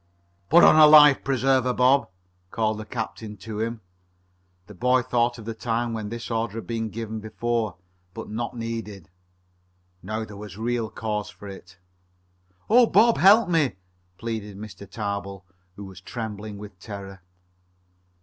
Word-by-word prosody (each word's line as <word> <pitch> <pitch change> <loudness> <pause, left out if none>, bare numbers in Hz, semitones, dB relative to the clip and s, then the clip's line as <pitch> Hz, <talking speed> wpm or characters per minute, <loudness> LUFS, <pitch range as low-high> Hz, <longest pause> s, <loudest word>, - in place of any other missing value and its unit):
"Put 170 +2 +7
on - - +7
a 155 -1 +9
life 150 -2 +8
preserver, 130 -1 +1
Bob," 130 -1 +3 0.4
called 110 0 -1
the 110 - -7
captain 110 -2 -6
to 105 +2 -7
him. 115 0 -3 0.8
The 105 - -13
boy 125 +6 +2
thought 120 0 0
of 115 - -11
the 115 - -4
time 115 +1 -2
when 110 -2 -4
this 115 +1 -6
order 115 -2 -2
had 115 - -6
been 115 -1 -3
given 110 0 -5
before, 110 -1 -2 0.4
but - - -7
not 120 +3 -5
needed. 110 -6 -6 0.9
Now 110 +3 -4
there 105 - -11
was 105 -2 -9
real 115 0 -2
cause 105 -2 -4
for 105 -1 -12
it. 95 -1 -11 0.9
"Oh, 240 +2 +6
Bob! 225 +3 +4
Help 205 +3 +6
me!" 160 - +1 0.4
pleaded 110 -3 -5
Mr. 100 -2 -10
Tarbill, 100 -3 -5 0.3
who 100 - -9
was 95 -2 -12
trembling 105 -1 -6
with 100 -2 -11
terror. 95 -3 -9
110 Hz, 150 wpm, -24 LUFS, 105-120 Hz, 0.9 s, a